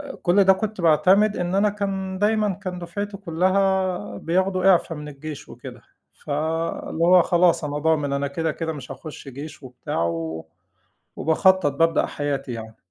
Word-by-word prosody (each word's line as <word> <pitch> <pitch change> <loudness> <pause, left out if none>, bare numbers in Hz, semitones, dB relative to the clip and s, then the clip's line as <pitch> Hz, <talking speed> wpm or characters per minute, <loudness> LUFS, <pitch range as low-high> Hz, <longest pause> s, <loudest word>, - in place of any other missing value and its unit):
آآ 280 -2 -8
كُل 190 +2 +4
ده 190 - +7
كنت 210 0 -3
باعتمد 190 +6 +4
إن 175 +1 -2
أنا 200 +2 +3
كان 195 -2 -3
دايمًا 210 0 +1
كان 180 0 -6
دُفعتي 200 +4 -5
كلّها 185 - 0
بياخدوا 185 - 0
إعفا 170 -1 +1
من 150 -1 -8
الجيش 150 +1 -8
وكده، - - -11 0.4
فاللي 160 +2 -2
هو 180 +1 +6
خلاص 175 -2 +3
أنا 145 0 -3
ضامن 150 -2 +1
أنا 140 0 0
كده، 160 +2 -2
كده 160 -1 -3
مش 140 -5 -9
هاخشّ 150 -3 -9
جيش 145 +3 -9
وبتاع، 125 -9 -4
و 80 -1 -3 0.7
وباخطّط، 185 +2 +3
بابدأ 165 +3 +2
حياتي 140 -3 -3
يعني. 110 -1 -8
170 Hz, 160 wpm, -23 LUFS, 145-190 Hz, 0.7 s, ده